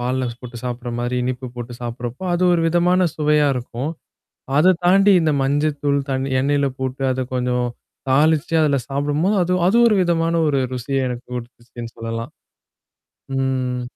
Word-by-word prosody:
பால்ல 125 +1 -1
போட்டு 125 -1 -9
சாப்பிடுற 120 0 -4
மாரி, 120 +1 -2
இனிப்பு 130 +1 -3
போட்டு 120 0 -7
சாப்படுறப்போ, 120 +5 -5
அது 175 - 0
ஒரு 170 - +2
விதமான 180 +2 +3
சுவையா 150 -1 +3
இருக்கும். 125 +3 -4 0.7
அத 180 +5 +6
தாண்டி 195 +3 +5
இந்த 160 -1 +2
மஞ்சத்தூள், 145 0 +1
தண் 130 0 -1
எண்ணெய்ல 140 +1 +1
போட்டு 130 +1 -3
அத 130 0 -2
கொஞ்சம் 125 -1 0 0.4
தாளிச்சு 155 +4 +2
அதில 145 -2 +2
சாப்பிடும்போது, 145 +8 0
அது 180 - -2 0.2
அது 195 - +2
ஒரு 215 - +3
விதமான 165 -1 +1
ஒரு 140 -2 +1
ருசிய 130 +1 -1
எனக்கு 125 0 -5
குடுத்துச்சுன்னு 120 -1 -9
சொல்லலாம். 115 0 -5 1.1
ம். 130 -2 -1
135 Hz, 145 wpm, -20 LUFS, 125-155 Hz, 1.1 s, அத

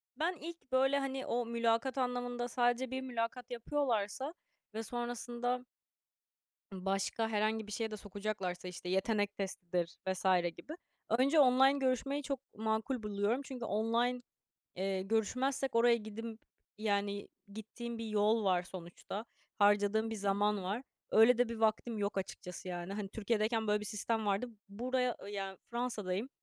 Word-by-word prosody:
Ben, 335 +4 0
ilk 335 -3 -8
böyle, 270 +2 +4
hani, 270 -1 -2
o 240 0 0
mülakat 235 +3 +1
anlamında 245 -1 -1
sadece 245 +1 +1
bir 260 0 -2
mülakat 245 0 -3
yapıyorlarsa 245 +1 0 0.4
ve 220 +1 -3
sonrasında 240 +1 -2 1.1
ımm, 185 0 -7
başka 195 +3 +1
herhangi 215 0 +1
bir - - -8
şeye 220 +1 -2
de 215 - -4
sokacaklarsa, 200 -3 -3
işte, 180 0 -6
yetenek 205 +2 +1
testidir 180 -3 -2
vs 190 0 -1 0.3
gibi 310 - -8 0.4
önce 270 +7 +4
online 265 0 +7
görüşmeyi 270 +2 +1
çok 275 -1 -2 0.2
makul 220 +3 0
buluyorum 210 +4 +1
çünkü 255 -3 -5
online, 230 +4 +1 0.6
eee, 190 0 0
görüşmezsek 255 +6 0
oraya 235 0 +6
gidimp 225 +1 -6 0.4
yani, 200 -1 0 0.2
gittiğim 230 +2 -6
bir 230 - -4
yol 215 +1 +3
var 185 -2 +3
sonuçta. 185 +3 -7 0.3
Harcadığım 205 +2 +4
bir 225 - -3
zaman 205 0 +2
var. 200 +7 -2 0.3
Öyle 225 +2 +7
de 245 -1 +4
bir 230 - -4
vaktim 220 +1 +1
yok 200 -1 0
açıkçası 180 -1 -6
yani. 175 +1 -4
Hani, 200 -1 -3
Türkiye'deyken 220 +1 0
böyle 210 0 +3
bir - - -5
sistem 220 +1 -1
vardı. 200 +4 +1 0.2
Buraya, 250 +4 0
yani, 195 -2 -4
Fransa'dayım, 230 -3 -2
225 Hz, 145 wpm, -34 LUFS, 205-245 Hz, 1.1 s, online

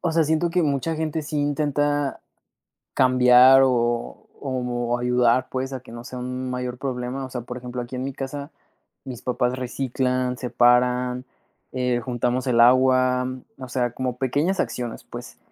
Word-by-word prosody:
o 170 -2 -1
sea, 165 -1 +3
siento 160 +3 +1
que 180 0 +1
mucha 150 +2 -1
gente 160 0 -2
sí 150 0 -3
intenta 145 -1 0 0.7
cambiar 130 +1 +6
o 120 -2 0 0.3
o - - -2
como 120 -1 -2
ayudar 125 0 +2
pues, 130 +1 -3
a 130 - -4
que 125 -2 -14
no 120 0 -8
sea 125 0 -8
un 125 +1 -4
mayor 125 0 -4
problema. 130 0 -4
O - - -9
sea, 125 -1 -5
por 125 +1 -8
ejemplo, 125 0 -6
aquí 120 +1 -7
en 125 - -3
mi 135 - -3
casa, 140 +3 -6 0.5
mis 125 -2 -7
papás 125 0 -1
reciclan, 125 0 -2
separan, 125 0 +2 0.5
eh, 125 -1 -1
juntamos 125 +1 -1
el 120 -2 +2
agua, 130 +1 +4 0.3
o 130 -1 -9
sea, 120 -1 -1
como 125 -1 -3
pequeñas 145 +8 0
acciones, 120 -2 -3
pues, - - -10
125 Hz, 165 wpm, -23 LUFS, 125-135 Hz, 0.7 s, cambiar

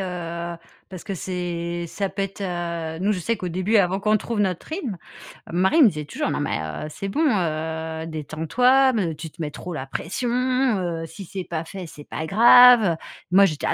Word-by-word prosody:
heu, 170 -2 -4 0.3
parce 185 -2 -9
que 195 - -5
c'est 175 -1 -4
ça 195 +3 -2
peut 195 +1 -3
être 195 +1 -5
heu, 170 -3 -3
nous, 200 +3 +1
je 195 - -2
sais 230 +7 -1
qu'au 180 - -4
début, 185 +6 +1
avant 190 -1 +3
qu'on 215 +1 +2
trouve 225 +1 -4
notre 185 -4 -1
rythme, 285 - -4 0.6
mon 175 - 0
mari 190 - +3
me - - +8
disait 150 -4 -6
toujours: - - -3
«Non, - - -2
mais - - -1
heu, 80 - -5
c'est 195 +6 -6
bon, 245 +11 -1 0.2
heu, 160 -1 -3
détends-toi 245 - +2
mais 185 -7 0
tu 160 +2 -7
te - - -28
mets 150 -2 -3
trop 180 +4 -7
la 130 - -4
pression, 170 - -3
heu. 240 -10 0
Si 195 +4 -10
c'est 190 +1 -5
pas 165 -2 -4
fait, 185 +2 -8
c'est 150 -2 -11
pas 160 - -4
grave, 240 +4 +8
heu». - - -4 0.4
Moi, 195 +2 +7
j'étais 155 -6 -2
là: - - +2
180 Hz, 215 wpm, -23 LUFS, 165-205 Hz, 0.6 s, me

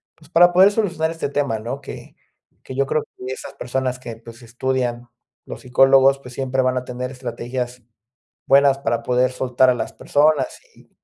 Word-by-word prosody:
pues, 155 -1 -21
para 175 +1 +5
poder 190 +3 +6
solucionar 180 -7 -1
este 165 -3 -4
tema, 140 -5 -1
¿no? 120 +6 -6
Que 135 - -10 0.5
que 130 - -8
yo 140 +1 +1
creo 155 +2 0
que 130 +1 -8
esas - - -9
personas 130 0 -2
que, 120 -3 -8
pues, 115 +2 -14
estudian, 120 0 -2 0.4
los - - -9
psicólogos, 135 +1 +4
pues 125 -2 -12
siempre 130 0 -1
van 130 0 0
a 125 - -3
tener 125 0 -5
estrategias 125 -1 -5 0.7
buenas 140 0 +5
para 115 -3 -1
poder 125 +1 +1
soltar 130 0 +2
a - - +2
las - - -4
personas 145 -2 +1 0.2
y - - -22
130 Hz, 180 wpm, -21 LUFS, 125-140 Hz, 0.7 s, poder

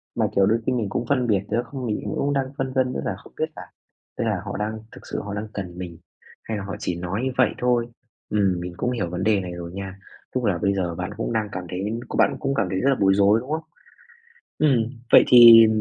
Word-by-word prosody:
mà, - - +1
kiểu, 100 -1 +5
đôi 115 +3 +2
khi - - +1
mình 110 -5 -1
cũng 120 - -2
phân 130 -3 +2
biệt 100 -4 +2
nữa 120 - +1
không 130 +1 -6
mình 110 -3 -1 0.2
cũng 140 +1 0
đang 135 -1 +1
phân 130 -1 -3
vân 130 -1 +1
nữa - - -3
là - - -2
không - - -17
biết - - 0
là, - - -8 0.6
tức - - -1
là 105 -5 -1
họ 100 - -4
đang 110 +1 -3
thực - - -13
sự - - -2
họ 100 - -6
đang 105 +1 -4
cần 90 -3 -6
mình, 90 -2 -7 0.5
hay 110 - -4
là 100 - -5
họ 100 - -5
chỉ 90 - -2
nói 90 +5 -3
như 130 - 0
vậy 125 - +4
thôi. 120 -1 +2 0.4
Ừm, 100 -4 +1
mình 90 0 -6
cũng 125 - -1
hiểu 100 -9 -2
vấn 90 - -4
đề 105 -2 +3
này 90 -1 -6
rồi 85 -1 -7
nha. 95 0 -7 0.4
Tức 130 - 0
là 95 -4 +1
bây 100 +3 +1
giờ 90 -3 -2
bạn 90 +1 -4
cũng - - -2
đang 110 -2 -1
cảm 90 - -5
thấy 100 +6 -3
của - - -5
bạn - - +3
cũng 135 - -1
cảm 100 - +1
thấy 95 - -1
rất 135 - +2
là 135 - +3
bối 95 -1 +4
rối, 100 +2 +4
đúng 130 +5 -8
không? 160 +1 -2 1.0
Ừm, 145 -5 +4 0.3
vậy - - +9
thì 115 -2 +10
105 Hz, 265 wpm, -23 LUFS, 95-125 Hz, 1.0 s, thì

